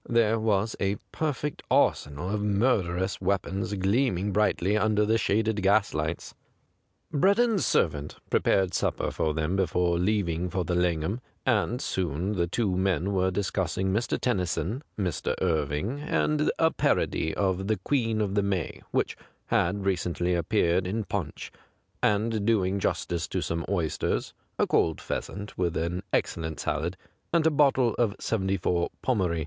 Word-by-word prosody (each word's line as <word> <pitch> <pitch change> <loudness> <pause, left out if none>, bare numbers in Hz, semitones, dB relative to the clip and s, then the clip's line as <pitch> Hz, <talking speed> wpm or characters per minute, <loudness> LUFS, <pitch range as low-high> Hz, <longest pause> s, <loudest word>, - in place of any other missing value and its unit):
Thei'C 115 -1 +3
was 110 0 +1
a 95 +1 +1 0.2
perfect 150 -1 -2
arsenal 75 +6 +1
of 105 0 -1
murderous 100 -4 +1
weapons 95 +1 -1
gleaming 100 0 +1
brightly 100 -1 +2
under 105 0 +2
the 110 +2 +2
shaded 110 0 +1
gaslights. 95 -5 +1 0.8
Breddon's 200 +7 +3
servant 75 -3 +1 0.2
prepared 95 -2 +2
sup - - 0
per - - -2
for 80 -2 -1
them 80 +3 0
before 90 -2 +1
leaving 90 -3 0
for 90 0 -2
the 90 - -1
Langham, 90 +5 0 0.2
and 120 0 +1
soon 90 - -2
the 85 -4 0
two 100 +3 0
ntien 95 -1 +1
were 95 -1 +2
discussing 95 -1 -1
Mr. 115 +4 0
Tennyson, 95 - -1 0.2
Mr. 90 -7 -1
Irving, 80 - 0
and 150 0 +1
a 160 0 +3
parody 80 - 0
of 95 -1 0
the 110 -1 +1
' - - -26
Queen 115 -6 +1
of 100 -2 -1
the 100 - +2
May 95 -4 -2
' - - -37
which - - 0 0.3
had 95 +3 +1
recently 90 -1 0
appeared 90 +1 +1
in 110 +4 -1
Piincli, 95 -7 -4 0.5
and 105 +1 +1
doing 100 -3 +2
justice 85 -3 -1
to - - -2
some 85 0 -2
oysters, 85 -6 -1 0.2
a - - +3
cold 80 -1 +2
pheasant 100 +1 -5
with 85 -2 0
an 85 +3 -1
excellent 80 -1 -1
salad, 80 +5 -2 0.3
and 165 -1 +3
a 160 - +5
bottle 135 -5 +3
of 110 -4 +2
'74 95 -4 0 0.2
Pommery. 95 -10 +1
95 Hz, 150 wpm, -27 LUFS, 85-110 Hz, 0.8 s, a